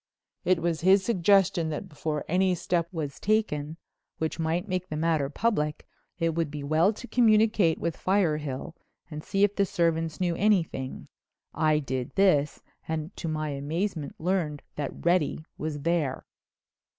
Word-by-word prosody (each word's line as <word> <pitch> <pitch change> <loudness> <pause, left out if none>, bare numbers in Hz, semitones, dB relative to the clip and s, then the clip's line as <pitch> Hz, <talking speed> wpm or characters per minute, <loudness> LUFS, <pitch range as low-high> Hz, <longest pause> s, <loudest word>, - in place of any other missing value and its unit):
It 180 -1 +2
was 170 -2 0
his 190 +2 +5
suggestion 195 -4 +3
that 155 +6 -4
before 150 -2 -3
any 185 +2 +2
step 170 0 0
was 150 -5 -4
taken 165 -8 0 0.4
which 160 +1 -3
might 165 +4 -1
make 185 -1 -2
the 155 - -3
matter 155 -3 +1
public, 150 -4 -1 0.3
it 165 -2 0
would 165 -2 -1
be 145 -1 -6
well 160 +7 +3
to 245 - -10
communicate 215 -8 +4
with 170 -1 -2
Firehill 155 -6 0 0.4
and 150 0 -6
see 195 +1 +1
if 205 0 +3
the 200 - +3
servants 165 -4 0
knew 175 -2 0
anything. 170 -10 0 0.5
I 155 0 +2
did 130 -4 -3
this 170 -7 +3 0.2
and 160 +3 -4
to 170 - -4
my 155 -1 -2
amazement 150 +3 -3
learned 165 -4 -1
that 145 +1 -5
Reddy 170 -3 +1
was 150 -1 -3
there." 160 -4 0
165 Hz, 150 wpm, -27 LUFS, 150-185 Hz, 0.5 s, his